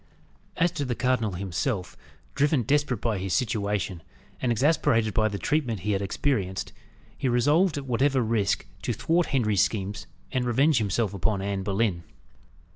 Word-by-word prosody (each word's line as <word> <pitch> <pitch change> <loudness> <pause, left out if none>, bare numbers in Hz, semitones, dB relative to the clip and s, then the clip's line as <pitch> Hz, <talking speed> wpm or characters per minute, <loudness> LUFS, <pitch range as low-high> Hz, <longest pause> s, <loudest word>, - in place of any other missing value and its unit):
As 175 0 +3
to 155 -5 -3
the 125 -3 -2
cardinal 125 -5 0
himself, 95 +3 -3 0.4
driven 145 -2 +2
desperate 140 -2 +1
by 110 -4 0
his 95 -1 -1
situation, 105 -6 -1 0.4
and 125 - +1
exasperated 120 -4 +2
by 110 -2 +3
the 100 -1 -3
treatment 125 - -1
he 105 - -1
had 100 -1 0
experienced, 100 -3 -1 0.4
he 130 - -1
resolved, 150 +8 +3
at 140 - -4
whatever 130 +1 +2
risk, 110 -3 0 0.2
to 120 - -1
thwart 165 - +1
Henry's 110 -8 +2
schemes, 100 -1 -2 0.2
and 130 -2 0
revenge 130 +4 +3
himself 105 0 0
upon 100 +1 0
Anne 100 0 -2
Boleyn. 100 -3 0
115 Hz, 155 wpm, -26 LUFS, 100-135 Hz, 0.4 s, As